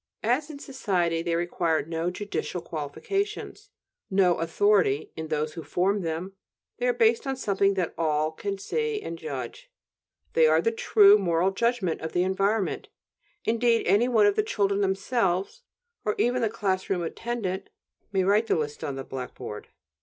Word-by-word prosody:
As 255 +7 +1
in 300 - -7
society, 185 - -1
they 170 0 -1
require 170 -2 0
no 165 +1 -2
"judicial 185 -1 -4
qualifications," 390 - -4 0.4
no 190 -3 +3
"authority" 165 -3 +2
in 160 0 -5
those 155 0 -1
who 170 - -6
form 185 +7 0
them; 170 +3 -4 0.5
they 250 - +1
are - - +4
based 230 +1 +2
on 270 - 0
something 200 -5 +1
that 180 -3 -1
"all" 155 -1 +1
can 200 +5 -4
see 450 - -2
and 165 - -6
judge; 140 -7 -6 0.6
they 160 -1 +5
are 155 +1 +4
the 230 +7 +1
true 210 -2 +6
moral 175 0 +2
judgment 220 -4 0
of 160 - -5
the 175 - +2
environment; 195 +2 0 0.6
indeed, 230 0 +2
any 205 +7 +4
one 225 -4 +4
of 205 -1 +3
the - - +3
children 200 -2 0
themselves, 195 - 0 0.4
or 210 - 0
even 245 +1 +1
the 225 - +2
class 195 -4 -2
room 180 -3 0
attendant, 195 0 -4 0.4
may 190 -2 +2
write 205 +4 +3
the - - +2
list 150 -2 -3
on 140 - -3
the 135 - -5
blackboard. 125 -5 -7
190 Hz, 165 wpm, -26 LUFS, 165-225 Hz, 0.6 s, true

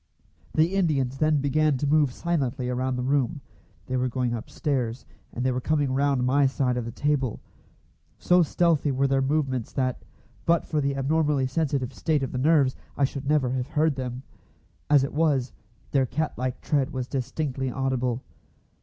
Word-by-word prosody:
The 160 +4 +3
Indians 140 -9 +1
then 155 -2 +3
began 150 0 +2
to 145 - -2
move 145 -2 +3
silently 135 -5 -2
around 130 +1 -1
the 125 - -2
room; 135 +1 +1 0.5
they 130 - -2
were 130 0 +1
going 125 -1 -1
upstairs, 120 +1 -2 0.3
and 125 - -3
they 130 - +3
were 125 0 -2
coming 145 -2 +1
round 135 -2 +2
my 140 +2 +4
side 130 -2 0
of 120 -2 -2
the 115 - -5
table. 135 -2 -1 0.8
So 180 0 +4
stealthy 160 -3 +2
were 135 +1 +1
their 135 0 +2
movements 135 -4 -1
that, 130 -2 -1 0.4
but 170 0 +2
for 155 -2 -1
the 140 0 0
abnormally 145 0 +1
sensitive 135 -2 -1
state 155 -4 0
of 130 - -3
the 125 - -3
nerves, 140 -2 +3 0.2
I 140 - +1
should 140 +1 -1
never 145 -5 +2
have 130 -1 -2
heard 155 0 +1
them. 130 -1 -5 0.7
As 145 -2 +5
it 135 - -3
was, 145 -5 +1 0.4
their 135 -2 +2
cat 155 +3 -2
like 130 0 -3
tread 140 -2 +1
was 130 -4 -4
distinctly 130 0 -2
audible. 130 -1 -1
135 Hz, 175 wpm, -26 LUFS, 130-150 Hz, 0.8 s, As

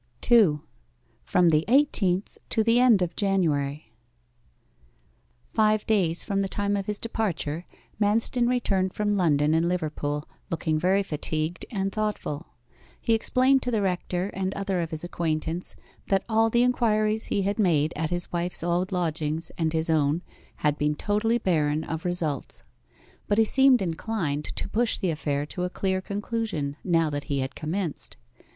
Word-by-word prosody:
2. 195 -12 +4 0.6
FROM 180 -1 +3
THE 155 -1 +3
EIGHTEENTH 210 -8 +2
TO 220 - +2
THE 230 +2 +4
END 235 -7 +5
OF 170 -1 -4
JANUARY 150 - 0 1.6
Five 215 -1 +2
days 180 -6 +3
from 195 -1 -1
the 195 - 0
time 200 +1 -1
of 195 -1 -3
his 210 -1 -2
departure, 180 -8 -3 0.4
Manston 230 +4 +2
returned 195 -7 0
from 210 -1 0
London 155 -5 +2
and 165 +2 +2
Liverpool, 150 -4 -2 0.2
looking 160 -2 -1
very 190 +4 +2
fatigued 155 0 -2
and 195 -3 -2
thoughtful. 210 -7 -3 0.5
He 230 - +1
explained 255 +4 +3
to 250 - -2
the 220 -4 0
rector 180 0 -1
and 190 0 -2
other 195 -2 -1
of 165 - -3
his 160 0 -4
acquaintance 165 0 -3 0.3
that 195 -1 +2
all 225 0 +3
the 235 +2 +3
inquiries 220 -3 +1
he 200 - 0
had 200 +3 -1
made 160 -6 +2
at 160 +1 -2
his 175 0 -3
wife's 175 0 -1
old 175 +2 0
lodgings 160 -3 -2
and 160 -2 0
his 160 0 +1
own 155 +1 +1 0.3
had 150 0 0
been 150 0 +1
totally 210 +6 +1
barren 155 -7 +1
of 160 +2 -5
results. 165 -6 -2 0.6
But 205 - +1
he 225 - +5
seemed 265 -1 +5
inclined 165 -4 -2
to - - -2
push 235 +1 0
the 185 - 0
affair 145 -2 -2
to 180 - -6
a 180 - -1
clear 190 0 -1
conclusion 200 - -3
now 165 -3 +2
that 145 0 -4
he 140 -3 -1
had 130 +1 -4
commenced. 160 - -3
180 Hz, 160 wpm, -26 LUFS, 155-210 Hz, 1.6 s, END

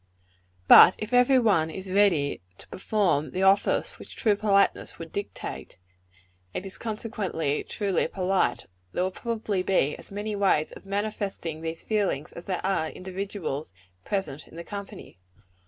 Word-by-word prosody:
But 180 - +10
if 215 +3 -6
every 250 +2 +5
one 200 -10 +3
is 190 +3 -7
ready 185 -8 +2 0.2
to - - -11
perform 185 -8 0
the 185 +7 -2
office 195 +1 +2
which - - -11
true 215 -3 +2
politeness 200 -1 +1
would 165 -1 -9
dictate 200 - -6 0.8
and 185 - -3
is 195 - -6
consequently 210 -9 -2
truly 200 -6 -1
polite 190 +1 0 0.3
there 180 - 0
will 185 - -1
probably 215 -2 -2
be 185 -6 +1
as - - -10
many 205 +1 -3
ways 190 -6 +2
of - - -13
manifesting 200 -5 -3
these 165 0 -4
feelings, 200 -9 -1
as 170 - -10
there 185 -2 -3
are 190 -5 +1
individuals 185 - -5 0.3
present 190 -8 -3
in - - -16
the 170 - -7
company. 200 - -9
195 Hz, 150 wpm, -26 LUFS, 165-205 Hz, 0.8 s, But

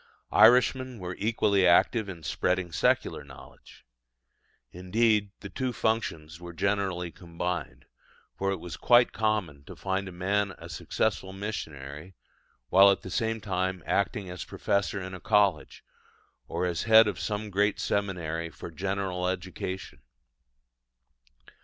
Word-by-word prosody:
Irishmen 130 0 +5
were 90 -2 -6
equally 100 -3 +2
active 100 +4 +3
in 85 -4 -8
spreading 90 +3 -1
secular - - +1
knowledge. 65 -3 -15 0.9
Indeed 105 +3 +1
the 100 - -7
two 130 -1 -2
functions 85 -9 -2
were 85 0 -8
generally 95 -2 -1
combined; 85 -2 -5 0.5
for 95 - -1
it 95 - -1
was 90 - -7
quite 120 0 +5
common 105 -10 -1
to - - -10
find 95 0 -2
a - - -7
man 95 +2 -1
a 85 - -11
successful 95 +2 -2
missionary, 80 -5 -6 0.5
while 100 +2 +7
at 100 - +1
the 95 - -7
same 115 +1 -1
time 95 -2 -2
acting 100 -1 0
as 90 -1 -6
professor 100 0 -1
in 95 0 -7
a 90 - -7
college, 100 -7 +1 0.6
or 85 +2 -2
as 85 -2 -1
head 110 0 +8
of 105 - -3
some 105 0 -3
great 100 +2 +1
seminary 85 -5 -2
for 85 - -9
general 95 +1 -2
education. 95 -3 -5
95 Hz, 135 wpm, -28 LUFS, 90-105 Hz, 0.9 s, head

